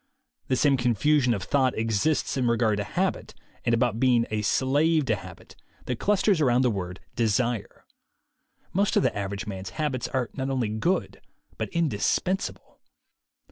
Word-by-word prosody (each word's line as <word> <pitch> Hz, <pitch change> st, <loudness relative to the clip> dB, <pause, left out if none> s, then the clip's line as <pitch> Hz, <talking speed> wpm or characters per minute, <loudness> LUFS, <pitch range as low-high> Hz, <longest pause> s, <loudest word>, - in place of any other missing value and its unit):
The 130 Hz, -, +1 dB
same 140 Hz, +1 st, +3 dB
confusion 125 Hz, +3 st, +2 dB
of 100 Hz, -, -5 dB
thought 130 Hz, -3 st, +1 dB
exists 115 Hz, +7 st, 0 dB
in 130 Hz, -3 st, +1 dB
re 115 Hz, 0 st, +2 dB
gard 110 Hz, -3 st, +2 dB
to 105 Hz, -, -1 dB
habit, -, -, -2 dB, 0.3 s
and 120 Hz, -, +2 dB
about 115 Hz, -1 st, 0 dB
being 120 Hz, -2 st, +3 dB
a 110 Hz, 0 st, 0 dB
"slave 145 Hz, +7 st, +2 dB
to 110 Hz, -, +1 dB
habit," 95 Hz, -3 st, -12 dB, 0.3 s
that 125 Hz, -2 st, -3 dB
clusters 195 Hz, -3 st, +2 dB
around 125 Hz, -2 st, +3 dB
the 125 Hz, -, +3 dB
word 90 Hz, -2 st, -5 dB, 0.2 s
"desire." 115 Hz, -1 st, -1 dB, 0.9 s
Most 200 Hz, +2 st, +1 dB
of -, -, +3 dB
the 130 Hz, -, +1 dB
average 100 Hz, 0 st, -4 dB
man's 95 Hz, -2 st, -6 dB
habits 145 Hz, -6 st, -1 dB
are 130 Hz, -3 st, -2 dB
not 135 Hz, -1 st, -3 dB
only 130 Hz, -5 st, 0 dB
good 165 Hz, -, -1 dB, 0.3 s
but -, -, -4 dB
in 170 Hz, -1 st, +1 dB
dispensable. 180 Hz, -, -2 dB
125 Hz, 165 wpm, -26 LUFS, 110-145 Hz, 0.9 s, same